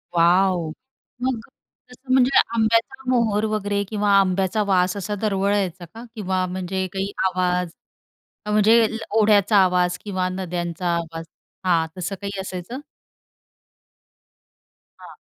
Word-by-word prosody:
Wow! 175 0 +3 0.5
मग 255 -2 -1 0.5
तसं 255 +1 -9
म्हणजे 260 +1 +4 0.2
आंब्याचा 230 +2 +1
मोहोर 220 -4 +2
वगैरे 205 -1 -1
किंवा 210 -1 -1
आंब्याचा 190 +2 +1
वास 185 0 +2
असा 205 +2 -3
दरवळायचा 195 -3 0
का 230 +1 -10
किंवा 185 -3 -1
म्हणजे 185 +1 -3
काही 195 +1 -2
आवाज 180 -1 0 0.8
म्हणजे 215 +2 +5
अ, - - +1 0.3
ओढ्याचा 210 0 +4
आवाज 180 -1 +1
किंवा 185 -3 -1
नद्यांचा 175 -1 -4
आवाज 165 -1 -5 0.4
हां 170 -3 +2
तसं 180 +2 -3
काही 200 -1 -5
असायचं? 190 +7 -6 2.2
हां. - - -13
190 Hz, 115 wpm, -22 LUFS, 180-210 Hz, 2.2 s, म्हणजे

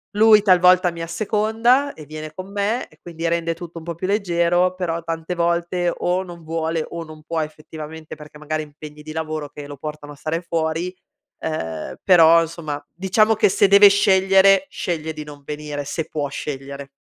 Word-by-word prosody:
Lui 215 0 +7
talvolta 180 -2 +5
mi 170 0 -8
asseconda 220 +9 +1
e 155 - -12
viene 155 0 -8
con 185 +4 -8
me 205 +4 -1
e - - -24
quindi 165 -1 -5
rende 165 0 0
tutto 170 0 -10
un - - -13
po' 170 -1 -4
più 185 +3 -4
leggero, 180 -2 +1
però 170 -2 -2
tante 165 +1 -4
volte 170 +1 0
o 180 +1 0
non 175 -2 -11
vuole 160 0 -2
o 170 0 -5
non 155 -1 -13
può 165 +1 -3
effettivamente, 155 0 -8
perché 150 0 -13
magari 155 +1 -3
ha - - -9
impegni 150 0 -12
di 155 0 -8
lavoro 155 -2 -4
che 145 0 -9
lo 145 0 -9
portano 150 +1 -7
a - - -14
stare 155 +3 -3
fuori, 165 +1 -2 0.5
ehm, 80 - -4
però 165 -2 +6
insomma, 155 -3 -6
diciamo 210 +5 +2
che 215 0 +4
se 200 +1 +4
deve 200 +1 +9
scegliere, 195 -1 +4
sceglie 160 -2 -3
di 155 0 -7
non 145 -1 -12
venire, 150 -1 -5
se 160 +2 -4
può 145 -2 -2
scegliere. 140 -1 -6
165 Hz, 185 wpm, -21 LUFS, 155-185 Hz, 0.5 s, deve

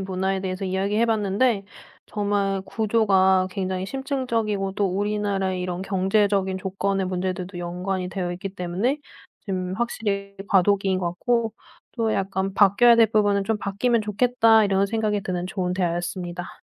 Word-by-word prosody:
문화에 190 0 -1
대해서 185 0 -3
이야기해 200 +5 0
봤는데 210 0 +1 0.4
정말 200 -2 -1
구조가 195 -4 +3
굉장히 190 -1 -2
심층적이고 230 -7 -2
또 200 0 0
우리나라의 195 -1 -1
이런 180 0 -3
경제적인 195 0 +1
조건의 195 0 -1
문제들도 185 0 -3
연관이 180 +1 -3
되어 180 -2 -3
있기 185 +2 -5
때문에 190 +11 -1 0.5
좀 185 -1 -2
확실히 200 -4 -2
과도기인 195 0 +3
것 175 - -2
같고 230 +5 0 0.4
또 225 -2 0
약간 195 0 -1
'바뀌어야 215 +4 +5
될 225 -1 +6
부분은 205 -2 +2
좀 220 +1 0
바뀌면 220 +5 0
좋겠다.' 225 +1 +4
이런 195 0 +2
생각이 210 -1 -1
드는 180 -1 -3
좋은 180 -2 -2
대화였습니다. 175 0 -3
195 Hz, 355 characters per minute, -24 LUFS, 185-210 Hz, 0.5 s, 될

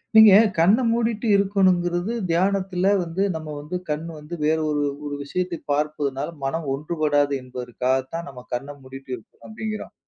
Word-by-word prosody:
நீங்க 220 -1 +10 0.3
கண்ண 175 +7 +5
மூடிட்டு 230 -1 0
இருக்கணுங்கிறது, 185 -1 +2 0.2
தியானத்துல 190 +2 +1
வந்து 175 +3 -1
நம்ம 155 -1 -6
வந்து 150 +5 -6
கண் 150 +2 -2
வந்து 150 +3 -7
வேற 155 +1 +3
ஒரு, 145 -1 0 0.2
ஒரு 145 0 -3
விஷயத்த 175 +4 -2
பார்ப்பதுனால 145 -1 -1
மனம் 155 +4 -2
ஒன்றுபடாது 145 -1 +1
என்பதற்காகத்தான் 130 +5 -2
நம்ம 125 -2 -11
கண்ண 140 +4 -3
மூடிட்டு 135 0 -11
இருக்கணும் 115 - -17
அப்டிங்கிறோம் 215 0 -5
160 Hz, 135 wpm, -23 LUFS, 140-185 Hz, 0.3 s, நீங்க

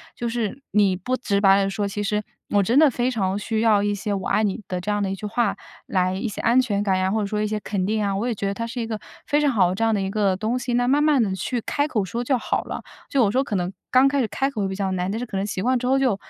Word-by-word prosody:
就 240 - -3
是 230 +1 -2
你 200 -2 +3
不 245 +8 -2
直 205 -5 0
白 195 0 +5
地 195 - 0
说， 200 +1 -2
其 205 +1 -4
实 210 0 -1 0.3
我 205 -1 +3
真 240 +8 +3
的 310 -2 +7
非 250 +1 0
常 195 -4 -1
需 220 +1 -2
要 215 -3 +4
一 205 0 +1
些 205 +1 -3
“我 195 - -3
爱 215 - +2
你” 210 +1 -1
的 180 -1 -3
这 210 - -5
样 205 0 0
的 190 - -1
一 - - -2
句 210 +2 -6
话 225 -1 0 0.3
来 185 -1 0
一 215 +5 -2
些 210 - -5
安 235 +3 +4
全 205 -6 +1
感 195 -2 +1
呀， 185 0 +1
或 220 - +1
者 200 - -1
说 210 +1 -2
一 - - +1
些 210 0 -2
肯 195 -3 -2
定 215 +1 0
啊， 200 -1 0
我 205 +4 -1
也 245 - 0
觉 200 -2 -3
得 195 - -1
它 230 - -3
是 235 +1 -4
一 225 - -3
个 220 -2 -4 0.3
非 295 - +2
常 295 -2 +3
好 190 -7 +3
的 185 - -2
这 225 - -1
样 225 -1 +3
的 200 - 0
一 190 - -2
个 200 -2 +1
东 220 +6 -1
西， 245 0 -3
那 245 0 +2
慢 290 +3 +3
慢 295 -5 +4
地 195 -3 0
去 240 +5 -2
开 285 +6 -1
口 225 -9 0
说 235 +6 -3
就 265 +2 +1
好 - - -1
了。 - - -6 0.3
就 270 -4 +2
我 200 - +3
说 265 +3 +2
可 210 - -3
能 180 0 -1 0.2
刚 255 +2 +6
开 280 +1 +1
始 230 - 0
开 270 +5 -1
口 210 -8 -2
比 190 - -4
较 195 -1 -1
难， 180 +1 -1
但 220 - -2
是 245 - -3
可 195 - -4
能 195 - -1
习 200 -2 -3
惯 255 +5 +2
之 245 - -4
后 265 +2 +3
就 255 -7 +2
210 Hz, 355 characters per minute, -23 LUFS, 195-245 Hz, 0.3 s, 的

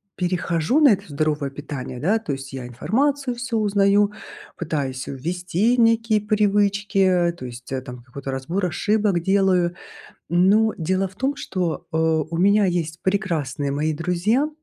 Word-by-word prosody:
перехожу 175 - 0
на 300 -3 +7
это 200 -2 +1
здоровое 150 -1 -1
питание, 135 -3 -7
да, 200 - +2
то 185 -10 -4
есть 135 0 -7
я 130 -2 -6
информацию 250 - 0
всю 240 -1 -2
узнаю, 205 0 +3 0.5
пытаюсь 140 -6 -3
ввести 175 - 0
некие 230 -2 +3
привычки, 200 -3 +2
то 130 - -8
есть, 125 +1 -9
э, 130 -1 -2
там 125 -2 -10
какой-то 135 +2 -8
разбор 165 +9 -2
ошибок 205 0 +1
делаю. 185 -2 +2 0.5
Но 200 +6 +3
дело 185 +4 0
в 185 - -19
том, 265 +7 -1
что, 180 -4 -3
э, - - -1
у 160 0 +1
меня 200 +3 +4
есть 165 -3 -2
прекрасные 160 -8 -1
мои 150 +3 0
друзья, 180 - +1
180 Hz, 150 wpm, -22 LUFS, 150-205 Hz, 0.5 s, на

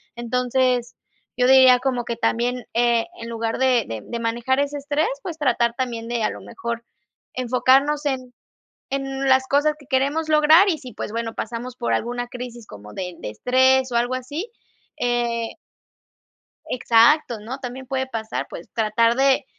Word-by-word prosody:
Entonces, 250 0 0 0.4
yo 250 - +3
diría 260 -1 +7
como 250 -2 -1
que 235 - -3
también, 245 +2 -1
eh, 235 -1 +2 0.2
en 230 - -6
lugar 230 0 -3
de 255 -4 +3
de 110 -1 -5
de 235 - -5
manejar 235 +3 0
ese 285 +1 -1
estrés, 290 +2 0
pues, 335 -3 -6
tratar 235 -5 +1
también, 235 -3 -3
de 235 -2 -2
a - - +2
lo - - -9
mejor, 235 0 -5 0.5
enfocarnos 265 +4 +2
en 255 -2 -3 0.6
en 270 0 -3
las 260 0 +4
cosas 290 +2 +2
que 285 - -17
queremos 285 +4 +1
lograr. 310 +5 +6
Y 320 - -1
sí, 255 -3 -10
pues, 210 - -5
bueno, 230 -1 -3
pasamos 240 +2 -5
por 240 - -2
alguna 245 +1 -2
crisis, 245 -2 -8
como 105 +1 -12
de 180 -2 -5
de - - -6
estrés, 260 - +3
o 235 - 0
algo 245 +2 +1
así, 285 - -5 0.5
eh 235 -1 -1 1.2
exacto, 235 +1 +3
¿no? 245 +6 -7
También 260 0 -7
puede 265 0 -2
pasar. 225 -3 -4
Pues, 170 - -9
tratar 230 +1 +2
de 270 +1 +3
250 Hz, 165 wpm, -22 LUFS, 235-265 Hz, 1.2 s, diría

